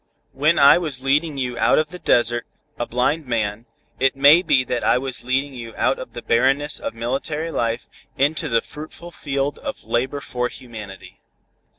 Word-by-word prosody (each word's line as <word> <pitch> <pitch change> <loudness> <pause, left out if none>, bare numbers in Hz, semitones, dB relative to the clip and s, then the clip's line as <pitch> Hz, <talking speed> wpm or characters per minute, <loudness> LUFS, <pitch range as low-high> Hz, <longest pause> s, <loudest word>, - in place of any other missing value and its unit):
When 150 +5 +2
I 140 +4 +7
was 145 -7 -4
leading 145 +2 +1
you 125 -2 -3
out - - +4
of 155 0 +1
the 180 +2 -9
desert, 120 -4 +2 0.3
a 120 - -2
blind 135 +5 0
man, 110 -1 -2 0.3
it 135 +1 +2
may 145 +5 +7
be 135 -8 +3
that 125 -1 -3
I - - +4
was 130 0 -4
leading 135 +3 -1
you 115 -3 -8
out - - +1
of - - -8
the - - -7
barrenness 135 +5 +2
of - - -5
military 140 +7 -3
life, 115 -5 -2 0.3
into 145 +3 +1
the 115 -1 +2
fruitful 155 +3 -10
field 140 -3 -3
of 275 -1 -6
labor 130 +4 -1
for 125 -3 -2
humanity." 110 -7 -11
135 Hz, 180 wpm, -21 LUFS, 120-150 Hz, 0.3 s, I